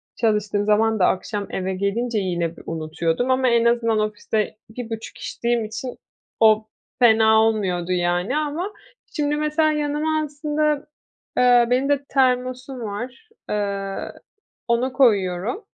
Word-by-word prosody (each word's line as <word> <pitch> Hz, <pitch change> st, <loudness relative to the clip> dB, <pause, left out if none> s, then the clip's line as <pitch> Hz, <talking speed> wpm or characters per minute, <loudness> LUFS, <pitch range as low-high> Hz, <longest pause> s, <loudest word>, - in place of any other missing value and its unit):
çalıştığım 210 Hz, -2 st, 0 dB
zaman 220 Hz, +1 st, +2 dB
da 180 Hz, -, +5 dB
akşam 200 Hz, +2 st, -2 dB
eve 190 Hz, 0 st, -2 dB
gelince 215 Hz, +4 st, -1 dB
yine 170 Hz, -3 st, -2 dB
b -, -, -11 dB
unutuyordum 165 Hz, +8 st, -1 dB
ama 260 Hz, 0 st, +2 dB
en 235 Hz, 0 st, +3 dB
azından 230 Hz, -2 st, +2 dB
ofiste 215 Hz, 0 st, -2 dB
1,5 225 Hz, -1 st, -7 dB
içtiğim 235 Hz, -1 st, -1 dB
için 245 Hz, +4 st, -6 dB, 0.4 s
o 215 Hz, -1 st, +5 dB, 0.3 s
fena 220 Hz, -2 st, +6 dB
olmuyordu, 185 Hz, -5 st, 0 dB
yani, 180 Hz, +8 st, 0 dB
ama, 315 Hz, +7 st, -2 dB, 0.4 s
şimdi, 295 Hz, -1 st, 0 dB
mesela, 305 Hz, +1 st, +1 dB
yanıma 300 Hz, +1 st, 0 dB
aslında, 300 Hz, 0 st, -1 dB, 0.5 s
eee, 245 Hz, -1 st, +5 dB
benim 260 Hz, +3 st, +1 dB
de 285 Hz, -1 st, +2 dB
termosum 255 Hz, 0 st, 0 dB
var. 240 Hz, -, -6 dB, 0.2 s
Eee, 200 Hz, -1 st, -3 dB, 0.6 s
ona 250 Hz, +2 st, +1 dB
koyuyorum. 210 Hz, -, +2 dB
230 Hz, 125 wpm, -22 LUFS, 205-265 Hz, 0.6 s, fena